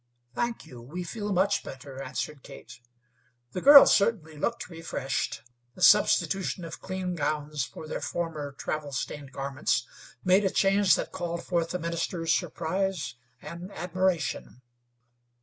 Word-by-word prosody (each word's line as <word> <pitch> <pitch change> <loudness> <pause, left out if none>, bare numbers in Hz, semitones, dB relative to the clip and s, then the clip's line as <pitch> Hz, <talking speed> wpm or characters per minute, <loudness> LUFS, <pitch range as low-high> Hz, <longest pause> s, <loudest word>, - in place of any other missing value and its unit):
"Thank 235 - -2
you, 125 -2 -11
we 160 +10 -6
feel 205 +3 -4
much 195 +2 +2
better," 135 0 -9
answered 135 +2 -4
Kate. 120 0 -12 0.7
The 180 - -4
girls 280 0 +10
certainly 195 -7 +1
looked 235 +10 -2
refreshed. 165 -6 -3 0.3
The 185 - -4
substitution 190 -3 +4
of 165 - -8
clean 185 -1 -3
gowns 150 -3 -2
for 155 - -10
their - - -4
former 155 -5 -3
travel 145 +1 -4
stained 140 +1 -4
garments 135 -3 -1 0.4
made 185 +2 +4
a 195 - +2
change 195 0 +4
that - - -4
called 170 -1 -4
forth 170 -2 0
the 180 - -2
minister's 170 0 -1
surprise 175 -4 -1 0.3
and 175 +3 -8
admiration. 180 -7 -2
170 Hz, 135 wpm, -28 LUFS, 145-190 Hz, 0.7 s, girls